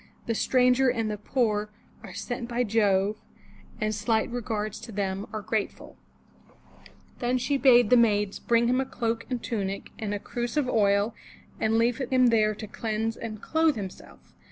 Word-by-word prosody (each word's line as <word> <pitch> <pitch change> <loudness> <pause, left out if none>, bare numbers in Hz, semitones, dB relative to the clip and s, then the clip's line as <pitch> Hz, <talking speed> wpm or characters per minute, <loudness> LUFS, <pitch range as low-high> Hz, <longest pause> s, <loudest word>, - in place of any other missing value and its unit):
The 230 - 0
stranger 250 +2 +3
and 225 -3 -1
the 210 - -3
poor 210 -2 0 0.3
Are - - -10
sent 245 -1 -4
by 245 +1 0
Jove, 205 -2 +2 0.6
and 215 -1 0
slight 220 +2 0
regards 215 -3 -3
to 230 +1 -10
them 195 0 -2
Are 215 -1 -5
grateful^ 215 +1 -3 1.2
Then 245 +1 +1
she 280 +3 0
bade 245 -5 +5
the 250 - +8
maids 210 -3 +2
bring 235 0 +2
him 255 +2 +2
a - - -2
cloak 230 -2 -3
and 250 -2 -3
tunic 200 -4 -3
and 215 -2 -3
a - - -3
cruse 240 +5 -4
of 290 -4 +2
oil 205 -1 +2 0.5
and 220 +1 +2
leave 235 +1 +2
him 255 -1 +3
there 215 -2 +3
to 215 - -7
cleanse 220 +1 -2
and 215 -2 -7
clothe 320 -2 +2
himself. 195 -4 -9
225 Hz, 170 wpm, -27 LUFS, 210-245 Hz, 1.2 s, the